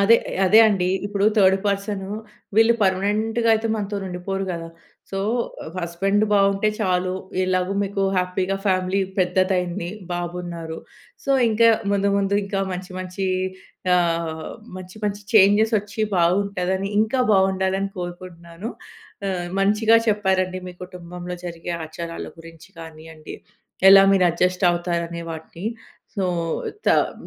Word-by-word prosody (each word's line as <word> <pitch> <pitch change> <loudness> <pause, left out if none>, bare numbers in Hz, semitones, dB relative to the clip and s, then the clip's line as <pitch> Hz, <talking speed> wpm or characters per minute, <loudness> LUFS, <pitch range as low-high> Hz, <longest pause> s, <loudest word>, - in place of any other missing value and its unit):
అదే. 215 +4 +6 0.3
అదే 210 +4 +6
అండి. 195 -4 +1 0.2
ఇప్పుడు 200 0 -1
థర్డ్ 190 -1 +5
పర్సనూ, 200 -1 -2 0.5
వీళ్ళు 225 +1 +6
పర్మనెంట్‌గయితే 220 +4 +1
మనతోనుండిపోరు 195 -2 -3
గదా! 165 -1 -5 0.4
సో, 195 - -3 0.5
ఆహ్, 160 - -9
హస్బెండ్ 195 +5 0
బావుంటే 200 +1 +3
చాలు. 185 -2 0 0.3
ఎలాగు 185 +1 0
మీకు 200 0 -2
హ్యాపీగా 185 +1 0
ఫ్యామిలీ 185 0 +1 0.2
పెద్దదయింది. 180 -1 0 0.2
బాబున్నారు. 175 -2 -5 0.5
సో, 275 - -2 0.2
ఇంకా 230 +1 +4 0.2
ముందు 200 0 +2
ముందు, 200 0 +1
ఇంకా 195 0 -2
మంచి 185 +1 -6
మంచీ 185 +1 -4 0.7
ఆహ్, 165 -2 -1 0.3
మంచి 185 +2 -10
మంచి 205 0 -2
చేంజెసొచ్చి 210 +1 +4
బావుంటదని, 190 +2 +1
ఇంకా 225 +4 +1
బావుండాలని 190 0 +1
కోరుకుంటున్నాను. 175 +2 -7 0.6
ఆహ్, 175 -2 -3
మంచిగా 215 +3 +4
చెప్పారండి 190 -3 +1
మీ 180 - -10
కుటుంబంలో 180 0 -8
జరిగే 170 0 -5
ఆచారాల 165 +1 -6
గురించి 165 +2 -14
కానియ్యండి, 160 -1 -10 0.5
ఎలా 195 0 +9
మీరడ్జస్టవుతారనే 175 -2 +1
వాటిని. 165 +4 -7 0.5
సో, 195 - 0 0.6
తమ్ - - +3
185 Hz, 110 wpm, -22 LUFS, 175-200 Hz, 0.7 s, ఎలా